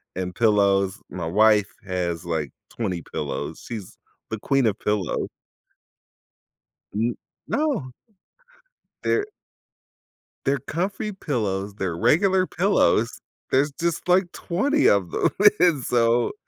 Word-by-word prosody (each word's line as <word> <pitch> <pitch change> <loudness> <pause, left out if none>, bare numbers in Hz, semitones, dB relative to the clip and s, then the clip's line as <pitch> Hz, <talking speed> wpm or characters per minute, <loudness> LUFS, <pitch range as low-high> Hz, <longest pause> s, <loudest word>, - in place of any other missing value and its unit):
and 90 0 -4
pillows. 100 -2 +3
My 85 -2 -5
wife 105 +3 +4 0.2
has, 85 -2 -2
like, 80 -5 -2 0.2
20 95 -7 -3
pillows, 75 - -4
she's 110 -6 -7 0.3
the 110 - -4
queen 135 +3 +2
of 105 -2 +1
pillow. 105 -4 -1 1.6
N 115 +3 0 0.3
no. 280 - -1 1.1
They're 420 - +1 1.2
they're 140 0 +2
comfy 195 +6 -3
pillows, 105 - -2
they're 90 -5 -2
regular 185 - +3
pillows, 165 - +2 0.3
there's 140 +2 +2
just, 170 +3 -2
like, 180 0 +3
20 285 - +1
of 100 -4 +3
them, - - +1 0.3
and 165 -7 +4
so 120 0 +2
115 Hz, 110 wpm, -24 LUFS, -, 1.6 s, wife